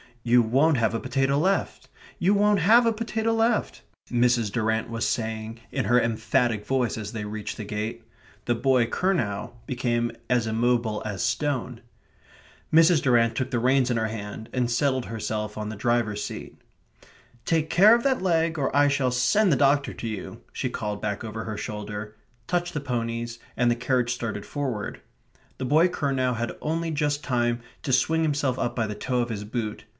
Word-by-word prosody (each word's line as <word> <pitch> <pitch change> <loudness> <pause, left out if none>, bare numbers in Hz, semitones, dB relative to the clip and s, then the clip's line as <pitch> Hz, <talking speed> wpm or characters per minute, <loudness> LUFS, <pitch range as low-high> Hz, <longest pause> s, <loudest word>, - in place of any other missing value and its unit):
"You 120 0 +5
won't 135 +7 +3
have 115 -2 +1
a 115 - -1
potato 135 +2 0
left 190 +6 0 0.3
you 185 +4 +3
won't 205 0 +3
have 225 +8 +6
a 230 - +3
potato 225 0 -1
left," 225 0 +1 0.3
Mrs. 120 -3 +2
Durrant 110 0 0
was 115 -1 -1
saying 110 0 -3
in 130 -5 -1
her 120 +4 +4
emphatic 115 0 0
voice 130 -1 0
as 105 -2 -5
they 105 -2 -5
reached 105 0 -5
the 110 - -5
gate. 105 +2 -4 0.4
The 120 - +2
boy 125 0 +3
Curnow 120 - -1
became 120 -2 -1 0.2
as 125 -2 +2
immobile 115 -1 0
as 100 -3 -3
stone. 130 -5 -1 0.9
Mrs. 165 0 +6
Durrant 115 -3 +3
took 130 0 -1
the 130 - -1
reins 130 +1 +3
in 120 - +1
her 110 -1 0
hands 110 0 -6
and 125 -2 0
settled 130 +1 +1
herself 110 -1 -4
on 105 0 -4
the 110 - -5
driver's 110 -1 0
seat. - - -7 0.9
"Take 160 -2 +1
care 210 +6 +7
of 235 - -1
that 265 -5 +1
leg, 165 -3 +1
or 135 - -1
I 145 0 +5
shall 140 -2 +1
send 170 - +3
the - - +4
doctor 140 +1 +2
to 115 - -6
you," 110 -3 -6
she - - -3
called 105 -1 -4
back 105 0 -3
over 110 0 -5
her 110 -2 -4
shoulder; 105 0 -6 0.3
touched 175 -1 -1
the - - 0
ponies; 120 -3 -3 0.2
and 120 0 +3
the - - +2
carriage 125 0 0
started 110 -4 -4
forward. 130 -8 -4 0.6
The 130 - -3
boy 155 +7 +4
Curnow 135 -7 0
had 115 0 -3
only 165 +2 -1
just 145 -1 -1
time 120 -2 0 0.2
to 140 - -3
swing 160 +5 +3
himself 145 -4 0
up 120 - -1
by 115 - 0
the 105 -1 -4
toe 125 +4 -1
of 120 - -2
his 105 -3 -4
boot. 110 -1 -4
120 Hz, 185 wpm, -25 LUFS, 110-145 Hz, 0.9 s, care